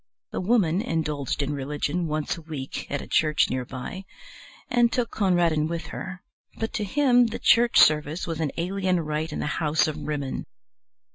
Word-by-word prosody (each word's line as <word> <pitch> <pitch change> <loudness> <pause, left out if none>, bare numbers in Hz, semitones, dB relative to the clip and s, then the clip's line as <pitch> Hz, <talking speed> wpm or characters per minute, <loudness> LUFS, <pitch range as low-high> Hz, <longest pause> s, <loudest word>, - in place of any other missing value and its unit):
The - - -3
Woman 190 -4 +2
indulged 150 - -2
in 145 +1 -2
religion 145 +5 -2
once 155 -1 -1
a 165 - -10
week 150 -4 -6
at 140 - -2
a - - -10
church 155 -1 +2
near 130 0 -2
by, 135 +10 -7 0.6
and 240 -1 +3
took 240 -2 -1
Conradin 175 -6 +2
with 170 0 -4
her, 190 0 -6 0.3
but 225 - -3
to 215 - -1
him 245 +2 +4
the 225 - -4
church 235 0 +4
service 155 +2 +4
was 165 -2 -4
an 155 -4 0
alien 185 +1 0
rite 155 +1 -3
in - - -4
the - - -2 0.2
House 155 0 +2
of 155 - -3
Rimmon. 145 -3 -3
165 Hz, 180 wpm, -25 LUFS, 150-195 Hz, 0.6 s, him